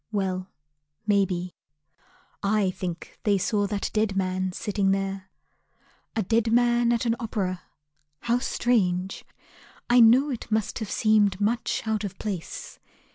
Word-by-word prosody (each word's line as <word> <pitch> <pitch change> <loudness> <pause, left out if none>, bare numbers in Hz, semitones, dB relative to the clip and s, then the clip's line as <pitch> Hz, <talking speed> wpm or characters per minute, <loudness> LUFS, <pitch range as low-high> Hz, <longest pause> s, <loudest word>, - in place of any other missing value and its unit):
Well, 190 -2 -2 0.6
may 200 -2 +4
be. 180 -1 -4 0.9
I 200 -1 +2
think 180 -2 -6
they 205 -2 +2
saw 205 +1 0
that 200 0 -3
dead 215 -2 +1
man 185 0 0
sitting 200 0 -1
there. 195 -1 -2 0.9
A 220 - +1
dead 225 +3 +1
man 240 0 +3
at 235 +1 +1
an 230 -1 +2
opera: 195 -6 -2 0.6
how 240 +1 +1
strange! 195 -8 0 0.7
I 245 - +7
know 250 +5 +6
it 240 - -6
must 215 -2 0
have 220 -3 -4
seemed 210 -3 +3
much 220 +3 0
out 220 -1 -1
of 195 -2 -5
place. 195 -6 -6
205 Hz, 135 wpm, -26 LUFS, 190-225 Hz, 0.9 s, I